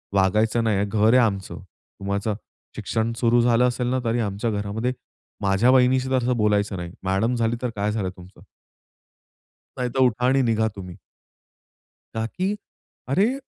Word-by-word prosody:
वागायचं 110 +4 +2
नाहीये 105 -3 +1
घर 105 +1 +1
आहे - - +7
आमचं, 100 -3 -3
तुम्हाचं 100 +2 -5 0.4
शिक्षण 110 +1 -1
सुरु 120 0 +3
झालं 120 +1 +3
असेल 125 0 -2
ना, 130 - +1
तरी 115 +1 +1
आमच्या 105 +1 -2
घरामध्ये 105 +4 -2 0.5
माझ्या 100 +4 +3
वहिनीशी 130 0 +3
तर 130 - +1
असं 125 -1 0
बोलायचं 105 -1 +1
नाही. 85 -1 -6
मॅडम 95 +6 +1
झाली 115 0 0
तर 125 - -1
काय 105 +1 -1
झालं 105 -4 -2
तुमचं?" 90 +2 -15 1.3
नाहीतर 125 +1 -2
उठा 125 -1 +2
आणि 135 +1 +3
निघा 110 -3 +1
तुम्ही. 90 -3 -8 1.2
का 110 0 -2
की 185 - -2 0.5
अरे 200 - +2
115 Hz, 150 wpm, -23 LUFS, 100-125 Hz, 1.3 s, आहे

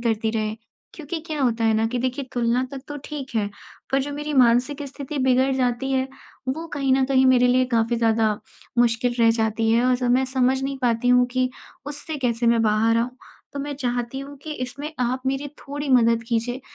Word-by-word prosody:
करती 225 -1 0
रहे 215 -1 -1 0.4
क्योंकि 320 +1 -5
क्या 310 -3 -3
होता 230 -3 +1
है 220 -1 +3
ना 220 +1 +2
कि 250 +2 -2
देखिए 255 +2 -2
तुलना 240 +1 +1
तक 270 -1 -6
तो 290 - -5
ठीक 285 -3 -6
है 205 -2 +1 0.5
पर 270 - +3
जो 290 +1 -5
मेरी 295 +1 -4
मानसिक 255 +3 +3
स्थिति 280 +1 -6
बिगड़ 260 +1 +3
जाती 250 +1 0
है, 265 0 +1 0.4
वो 320 +6 -2
कहीं 275 -2 +1
न 265 0 +3
कहीं 265 -1 +4
मेरे 250 -1 +5
लिए 255 +1 +4
काफ़ी 230 +1 +1
ज़्यादा 225 -1 +2 0.5
मुश्किल 240 +1 +2
रह 230 0 +6
जाती 225 0 +1
है 235 +2 +3
और 255 - +4
जब 245 -1 0
मैं 260 +1 +3
समझ 260 +1 +2
नहीं 270 0 -3
पाती 240 0 +1
हूँ 250 0 +5
कि 255 0 +1 0.4
उससे 295 +2 -6
कैसे 235 -2 0
मैं 230 -1 +4
बाहर 220 +1 +3
आऊँ, 235 +2 0 0.4
तो 285 - -5
मैं 285 +1 -4
चाहती 245 -1 -2
हूँ 280 +1 -9
कि 310 - -5
इसमें 280 +5 -7
आप 250 +1 0
मेरी 270 +2 -1 0.2
थोड़ी 290 +1 -4
मदद 230 -2 +4
कीजिए 245 +2 -1
250 Hz, 210 wpm, -23 LUFS, 230-270 Hz, 0.5 s, रह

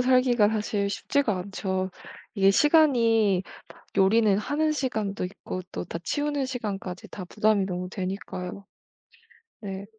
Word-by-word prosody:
살기가 250 -4 +4
사실 210 -2 -1
쉽지가 225 +1 0
않죠. 190 0 -3 0.4
이게 195 -1 +5
시간이 230 - +4 0.6
요리는 200 +1 +4
하는 300 +8 0
시간도 220 -10 -2
있고 185 0 -6
또 - - -4
다 170 - -5
치우는 290 - -1
시간까지 200 -8 -5
다 190 - -7
부담이 210 +1 +2
너무 180 -1 -4
되니까요. 190 0 -5 1.0
네. 195 -1 -6
205 Hz, 270 characters per minute, -26 LUFS, 190-250 Hz, 1.0 s, 이게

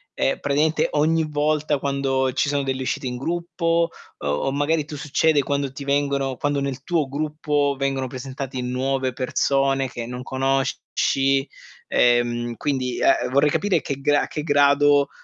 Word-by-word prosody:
ehm, - - 0
praticamente 150 +3 +1
ogni 160 +2 +2
volta 150 0 +1
quando 135 -1 0
ci 145 +3 +1
sono 140 -1 0
delle 130 -1 -2
uscite 130 - -2
in 125 0 -4
gruppo? 170 +2 0 0.3
O - - -2
o 75 - 0
magari 145 +3 +1
tu 150 - -7
succede 150 +1 +2
quando 140 -1 -1
ti 140 - -8
vengono 140 -2 0
quando 145 -1 0
nel 135 -1 -3
tuo 160 -3 0
gruppo 145 0 -1
vengono 135 -1 -1
presentati 130 0 -6
nuove 130 +1 -1
persone 135 +1 +1
che 120 -1 -6
non 125 +1 -6
conosci? 135 +1 0 0.4
Ehm, 120 -1 +2
quindi, 130 -4 -2
ehm, 125 - +3
vorrei 140 +2 +3
capire 200 +4 +1
che 140 -1 -5
gra 145 +1 +3
a - - -4
che 150 - -4
grado, 145 -1 +4
140 Hz, 160 wpm, -23 LUFS, 130-145 Hz, 0.4 s, grado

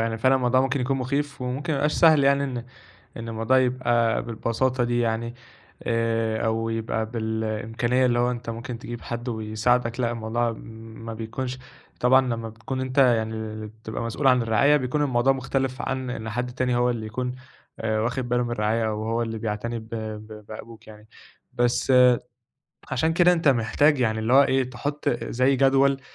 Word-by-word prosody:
يعني 115 0 -1
فعلًا 130 +3 +4
الموضوع 130 0 +3
ممكن 135 +1 0
يكون 135 +2 0
مُخيف 140 +2 -2
وممكن 130 +5 -3
ما - - 0
يبقاش 150 +2 +1
سهل، 155 -4 +5
يعني 140 0 +3
إن 125 -3 -4 0.5
إن 115 0 -6
الموضوع 115 +3 +2
يبقى 120 -3 +1
بالبساطة 120 +2 -1
دي 120 0 0
يعني، 115 0 -1 0.5
آآ 115 -1 0
أو 115 0 0
يبقى 110 0 -2
بالإمكانيّة 110 +2 -1
اللي 120 -1 +2
هو 120 +1 +2
أنت 120 -2 -5
ممكن 115 +1 -6
تجيب 120 -1 -7
حد 120 +1 -5
ويساعدك، 115 +2 0
لأ، 120 -1 +1
الموضوع 115 +1 -1
م - - -10 0.5
ما 115 - -5
بيكونش 125 +3 -5 0.4
طبعًا 130 +2 +6
لما 115 -1 -3
بتكون 115 +4 -5
أنت 130 +1 -3
يعني 115 -4 +3
ال 110 -1 -5
بتبقى 110 +1 -7
مسؤول 115 +5 -2
عن 125 -2 +5
الرعاية، 115 +6 +4
بيكون 145 +2 0
الموضوع 130 -1 +3
مختلِف 135 0 -2
عن 130 -1 -3
إن 110 -2 -5
حد 125 +3 -2
تاني 125 0 0
هو 125 0 +2
اللي 110 -2 -3
يكون 125 +3 -3 0.5
آآ 110 -1 0
واخِد 120 +2 -2
بالُه 125 0 +1
من 120 - -3
الرعاية 110 0 0
أو 110 0 -3
هو 115 +1 0
اللي 115 -1 -4
بيعتني 115 +2 -3
ب 110 - -11
ب 110 -1 -7
بأبوك 110 +1 -10
يعني. 105 0 -14 0.4
بس، 120 +1 +1 1.0
عشان 160 +5 +1
كده 175 +1 +5
أنت 165 -4 +1
محتاج، 135 +4 +3
يعني 110 -2 +1
اللي 110 +2 -1
هو 140 +2 +8
إيه، 130 -2 +1
تحُط 145 +4 -3
أ 120 - -2
زي 130 +3 +2
جدول 135 +1 +3
120 Hz, 185 wpm, -25 LUFS, 110-130 Hz, 1.0 s, هو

